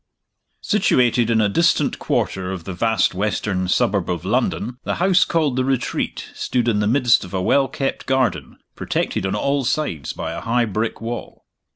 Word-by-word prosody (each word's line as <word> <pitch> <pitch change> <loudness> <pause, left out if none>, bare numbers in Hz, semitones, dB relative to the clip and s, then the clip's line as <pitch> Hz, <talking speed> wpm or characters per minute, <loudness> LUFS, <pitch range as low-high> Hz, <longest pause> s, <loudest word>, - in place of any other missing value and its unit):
SITUATED 120 -2 +2
in 115 -1 +3
a 105 - +3
distant 165 - +2
quarter 95 -1 -1
of 95 -3 -5
the 95 - -6
vast 110 +2 +1
western 95 -1 -1
suburb 90 - +1
of - - -3
London, 125 +3 -1
the - - -2
house 185 0 +4
called 150 -6 0
The 130 - +2
Retreat 130 -1 -2
stood 120 -2 -1
in 110 -3 +2
the 105 - +1
midst 120 0 +3
of 95 +1 -7
a 95 - 0
well 135 +7 +3
kept 135 +1 -3
garden, 125 - 0 0.2
protected 95 - -2
on 95 - -1
all 140 +5 0
sides 120 - -2
by - - -5
a - - -5
high 120 +1 +1
brick 110 +2 -3
wall. 120 +1 -6
115 Hz, 180 wpm, -21 LUFS, 95-130 Hz, 0.2 s, house